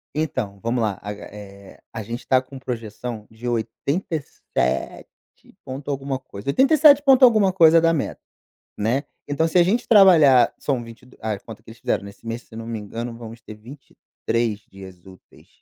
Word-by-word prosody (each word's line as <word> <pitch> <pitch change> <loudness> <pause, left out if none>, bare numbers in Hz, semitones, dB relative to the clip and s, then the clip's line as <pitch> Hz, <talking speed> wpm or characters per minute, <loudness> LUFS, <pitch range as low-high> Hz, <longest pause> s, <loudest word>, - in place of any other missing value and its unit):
Então, 130 -10 -3
vamo 120 +1 -1
lá. 105 -3 -1
A 105 +1 -5
ga 105 - -11
eh, 100 -1 -13
a 110 -1 -5
gente 115 +4 -7
tá 130 -1 +4
com 135 +1 -12
projeção 115 -2 -6
de 110 +2 -9
87 120 - -3 0.6
ponto 135 +2 -7
alguma 135 -1 -3
coisa, 115 -2 -9
87 285 - +5
ponto 270 -2 +7
alguma 215 -5 +4
coisa 165 -3 +6
da 165 0 +3
meta, 155 - -3 0.6
né, 120 +7 0 0.2
então 145 +3 +1
se 165 - -3
a 175 - +7
gente 210 +7 0
trabalhar, 165 - +6
são 135 -4 -2
22 115 +2 -15
a 110 -2 -2
conta 110 +1 -12
que - - -15
eles 115 - -13
fizeram - - -1
nesse 100 +3 -13
mês, 115 +1 -4
se 110 - -15
não 115 0 -7
me 115 -2 -4
engano, 115 +3 -6
vamos 115 0 -10
ter 110 - -11
23 115 -2 -5
dias 95 -2 -13
úteis, 95 -2 -18
120 Hz, 175 wpm, -22 LUFS, 110-150 Hz, 0.6 s, ponto